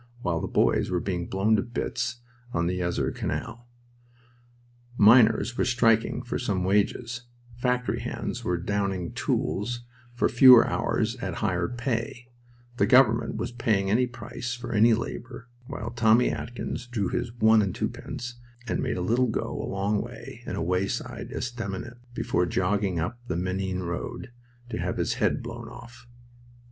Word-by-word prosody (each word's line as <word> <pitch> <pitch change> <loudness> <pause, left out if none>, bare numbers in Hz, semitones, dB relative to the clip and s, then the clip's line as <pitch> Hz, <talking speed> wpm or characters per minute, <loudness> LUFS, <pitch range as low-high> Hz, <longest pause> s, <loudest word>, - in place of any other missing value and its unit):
while 85 -2 0
the - - -2
boys - - +2
were 90 - 0
being 90 -1 -3
blown 100 +3 +2
to 105 - +2
bits 120 0 -3 0.3
on 85 0 +1
the 90 +1 -1
Yser 85 -1 0
Canal. 120 +1 -4 1.3
Miners 115 +2 +5
were - - +4
striking 120 0 +2
for 120 - -3 0.2
more 90 -1 -1
wages, 115 +5 0 0.3
factory 125 0 0
hands - - -4
were 90 - 0
downing 95 -1 -2
tools 120 +4 -1 0.3
for - - +2
fewer 125 -1 +8
hours - - 0
at - - -4
higher 90 -1 0
pay, 120 0 -3 0.5
the - - +3
government 120 -3 +4
was 110 +2 -3
paying 105 -5 +1
any 125 +4 +3
price 120 +1 -6
for 120 - -6
any 110 +2 +5
labor 120 +1 -6 0.2
while 115 +2 -5
Tommy 120 0 +4
Atkins 120 0 -5
drew 115 -5 -1
his 120 - -2
one 110 -1 +5
and 100 -3 -1
twopence 120 0 -5 0.3
and 115 - -1
made 125 -5 -1
a - - -2
little 120 +8 +2
go 110 - -2
a - - -4
long 100 +2 0
way - - -9
in - - -3
a 80 - -2
wayside 90 +3 -2
estaminet 120 -1 -5 0.2
before 90 - 0
jogging 95 0 0
up 110 +9 -3
the 85 - -2
Menin 95 +1 -2
road 85 +7 -5 0.4
to - - -4
have - - -2
his - - 0
head - - +1
blown - - -7
off. 120 +1 -13
115 Hz, 155 wpm, -27 LUFS, 95-120 Hz, 1.3 s, fewer